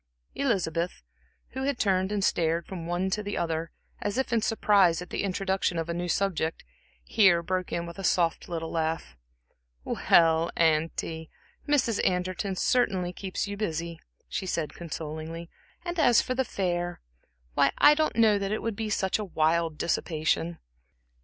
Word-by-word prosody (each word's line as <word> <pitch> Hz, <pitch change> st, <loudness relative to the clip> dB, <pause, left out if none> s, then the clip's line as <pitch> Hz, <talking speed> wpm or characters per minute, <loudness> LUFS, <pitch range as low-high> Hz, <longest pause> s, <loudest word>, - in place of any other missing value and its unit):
Elizabeth, 180 Hz, -, -1 dB, 0.5 s
who 265 Hz, -, -5 dB
had 280 Hz, -2 st, 0 dB
turned 190 Hz, -2 st, +1 dB
and 205 Hz, -2 st, 0 dB
stared 165 Hz, -2 st, +1 dB
from 170 Hz, -3 st, -7 dB
one 180 Hz, +2 st, -1 dB
to 210 Hz, -, 0 dB
the 205 Hz, 0 st, -4 dB
other, 165 Hz, -1 st, -1 dB, 0.3 s
as 205 Hz, +3 st, -2 dB
if 265 Hz, -2 st, -1 dB
in 230 Hz, -, +3 dB
surprise 200 Hz, -6 st, +3 dB
at 180 Hz, -, -8 dB
the -, -, -1 dB
introduction 190 Hz, -2 st, 0 dB
of 165 Hz, 0 st, -2 dB
a -, -, 0 dB
new 175 Hz, +1 st, -3 dB
subject, 170 Hz, -3 st, 0 dB, 0.4 s
here 175 Hz, -, +4 dB
broke 185 Hz, +1 st, -2 dB
in 170 Hz, 0 st, -2 dB
with 170 Hz, +2 st, -9 dB
a -, -, -5 dB
soft 170 Hz, -2 st, +1 dB
little 165 Hz, -1 st, -4 dB
laugh. 160 Hz, -, -2 dB, 0.7 s
"Well, 165 Hz, -, +3 dB
auntie, 160 Hz, 0 st, 0 dB, 0.4 s
Mrs. 260 Hz, -7 st, +2 dB
Anderton 185 Hz, +2 st, 0 dB
certainly 185 Hz, -5 st, +1 dB
keeps 190 Hz, +2 st, -3 dB
you 200 Hz, -, -4 dB
busy," 170 Hz, -5 st, -3 dB, 0.3 s
she 190 Hz, -, -4 dB
said, 165 Hz, -4 st, -2 dB
consolingly 160 Hz, 0 st, -6 dB, 0.3 s
"and 345 Hz, -1 st, -3 dB
as 245 Hz, -6 st, +6 dB
for 255 Hz, -, -1 dB
the 260 Hz, 0 st, 0 dB
fair 175 Hz, -4 st, -2 dB, 0.5 s
why, 140 Hz, -, +3 dB
I 295 Hz, -, +8 dB
don't 310 Hz, +1 st, 0 dB
know 220 Hz, -3 st, +4 dB
that 195 Hz, 0 st, -2 dB
it 215 Hz, -, -2 dB
would 225 Hz, -2 st, -2 dB
be 220 Hz, +1 st, -3 dB
such 190 Hz, -1 st, 0 dB
wild 165 Hz, -4 st, +1 dB
dissipation." 165 Hz, 0 st, 0 dB
180 Hz, 160 wpm, -28 LUFS, 165-205 Hz, 0.7 s, I